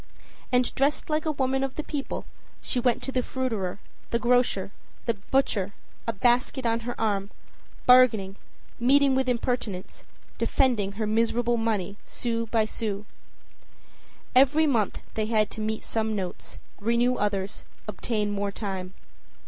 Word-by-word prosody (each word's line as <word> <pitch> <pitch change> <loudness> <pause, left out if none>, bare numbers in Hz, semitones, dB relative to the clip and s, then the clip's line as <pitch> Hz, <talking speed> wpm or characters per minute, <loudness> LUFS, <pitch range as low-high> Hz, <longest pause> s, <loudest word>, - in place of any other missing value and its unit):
And 250 -1 +2
dressed 285 +3 +1
like 310 +1 0
a - - +3
woman 270 -1 0
of 270 -1 -3
the 305 - -3
people, 290 -2 -4 0.3
she 250 - 0
went 245 0 +1
to 270 - -3
the 255 - +1
fruiterer, 225 -9 -2 0.3
the 235 - +2
grocer, 240 -5 +2 0.3
the 230 - +2
butcher, 205 -2 0 0.3
a - - +2
basket 245 +4 +2
on 230 0 +2
her 240 +1 -5
arm, 200 -3 0 0.6
bargaining, 225 -7 +6 0.4
meeting 275 +3 +5
with 260 -1 +1
impertinence, 235 -6 -2 0.4
defending 220 -7 +2
her 215 +2 -2
miserable 230 +2 +2
money, 215 -4 -1
sou 230 -1 -2
by 220 -1 +2
sou. 210 -2 -4 1.3
Every 275 +5 +5
month 230 -9 +1
they 215 -1 -1
had 215 -2 +2
to 220 - -6
meet 215 0 -2
some 220 -1 -1
notes, 185 -3 -5 0.2
renew 235 +4 +2
others, 200 -1 -1 0.2
obtain 210 0 -1
more 200 0 -1
time. 190 -3 -5
230 Hz, 140 wpm, -27 LUFS, 205-255 Hz, 1.3 s, bargaining